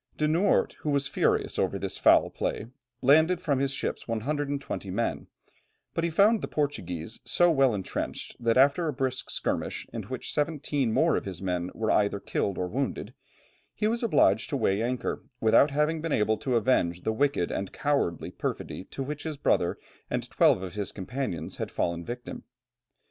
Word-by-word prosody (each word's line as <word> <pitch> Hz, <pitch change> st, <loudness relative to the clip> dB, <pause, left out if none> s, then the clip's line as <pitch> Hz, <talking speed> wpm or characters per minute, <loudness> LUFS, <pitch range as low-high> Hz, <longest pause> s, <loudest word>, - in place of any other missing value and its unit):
De 150 Hz, -, +2 dB
Noort, 170 Hz, +6 st, +2 dB
who 150 Hz, -, -3 dB
was 140 Hz, -1 st, +1 dB
furious -, -, 0 dB
over -, -, +1 dB
this -, -, -4 dB
foul -, -, +5 dB
play, -, -, -2 dB, 0.4 s
landed 160 Hz, +6 st, +5 dB
from 145 Hz, -7 st, 0 dB
his 135 Hz, 0 st, +1 dB
ships 135 Hz, -, -4 dB
120 140 Hz, -1 st, -2 dB
men; 105 Hz, +6 st, -2 dB, 0.7 s
but 165 Hz, -, -1 dB
he 170 Hz, -, +1 dB
found 205 Hz, +7 st, +4 dB
the -, -, -3 dB
Portuguese 110 Hz, -, -3 dB
so 175 Hz, 0 st, +3 dB
well 135 Hz, -4 st, +4 dB
entrenched, 95 Hz, -2 st, -4 dB
that 115 Hz, -1 st, +2 dB
after 140 Hz, +6 st, +4 dB
a 150 Hz, -, -1 dB
brisk 130 Hz, -1 st, -2 dB
skirmish -, -, -2 dB
in -, -, -3 dB
which -, -, -5 dB
seventeen 145 Hz, -4 st, 0 dB
more 160 Hz, +7 st, +3 dB
of -, -, -4 dB
his 95 Hz, -3 st, -5 dB
men 90 Hz, -2 st, -2 dB
were 110 Hz, -1 st, 0 dB
either 100 Hz, -1 st, +2 dB
killed 100 Hz, -1 st, -2 dB
or 90 Hz, -, -1 dB
wounded, 135 Hz, +8 st, -3 dB, 0.6 s
he -, -, -1 dB
was 235 Hz, +2 st, 0 dB
obliged 110 Hz, -, +3 dB
to 140 Hz, -, -1 dB
weigh 105 Hz, -4 st, +1 dB
anchor 125 Hz, +1 st, -2 dB, 0.2 s
without 115 Hz, +6 st, +5 dB
having 150 Hz, +3 st, 0 dB
been 165 Hz, 0 st, -3 dB
able 110 Hz, -2 st, +2 dB
to 130 Hz, -3 st, -1 dB
avenge 90 Hz, -7 st, +1 dB
the 110 Hz, -, 0 dB
wicked 140 Hz, -7 st, +1 dB
and 95 Hz, -, -3 dB
cowardly 140 Hz, -, -1 dB
perfidy 95 Hz, -, -4 dB
to 135 Hz, -, -5 dB
which 145 Hz, +2 st, -5 dB
his 155 Hz, -2 st, -5 dB
brother -, -, +1 dB, 0.3 s
and -, -, -2 dB
twelve 95 Hz, -, +4 dB
of 90 Hz, -2 st, -6 dB
his 100 Hz, -1 st, -3 dB
companions 95 Hz, -, -4 dB
had -, -, -3 dB
fallen 85 Hz, 0 st, -2 dB
victims. 120 Hz, +5 st, -6 dB
130 Hz, 180 wpm, -28 LUFS, 100-150 Hz, 0.7 s, foul